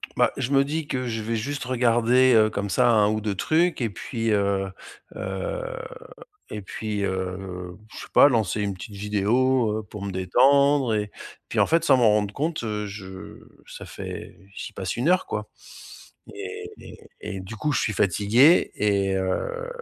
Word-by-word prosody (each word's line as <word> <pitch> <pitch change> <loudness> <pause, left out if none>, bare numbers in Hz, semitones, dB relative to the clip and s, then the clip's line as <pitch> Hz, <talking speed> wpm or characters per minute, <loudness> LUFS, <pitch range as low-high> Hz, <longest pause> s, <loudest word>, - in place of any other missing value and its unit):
Bah, - - +3
je 130 - -2
me 135 0 +5
dis 150 +2 -3
que 125 -1 -2
je 115 -1 -3
vais 115 +2 -2
juste 140 +6 -3
regarder, 125 +1 +3
heu, 110 -1 +5
comme 100 -1 -3
ça, 120 +7 +3
1 105 -2 +4
ou 110 0 -1
2 105 -2 -2
trucs 160 - +1
et 115 - 0
puis, 115 +2 -3
heu 100 -1 +1 0.4
heu - - -4 0.9
et 105 - -6
puis, 105 +1 -4
heu, 90 -1 -4
je - - -11
sais - - -8
pas 145 - +8
lancer 110 -4 0
une 100 -1 -1
petite 100 +3 -10
vidéo, 110 +3 +1
heu, - - -7
pour 105 0 -10
me 100 - -3
détendre 130 +7 +3
et 105 -1 -2 0.4
puis, - - -1
en - - +4
fait, 165 0 +2
sans 140 -5 +5
m'en 120 -3 +5
rendre 105 -1 0
compte, 155 +1 -2
heu, 105 -2 -3
je 95 -2 -9 0.3
ça - - -9
fait - - -8 0.2
j'y - - -6
passe 95 -1 -4
1 125 +8 0
heure, 185 0 +3
quoi - - -4 0.9
et 425 +1 -7
et - - -12 0.2
et 95 - -6
du 95 +4 -8
coup, 150 +6 -1
je 130 - +1
suis 110 - 0
fatigué 105 - +4
et 100 -2 +1
heu 285 - -2
110 Hz, 185 wpm, -24 LUFS, 100-130 Hz, 0.9 s, pas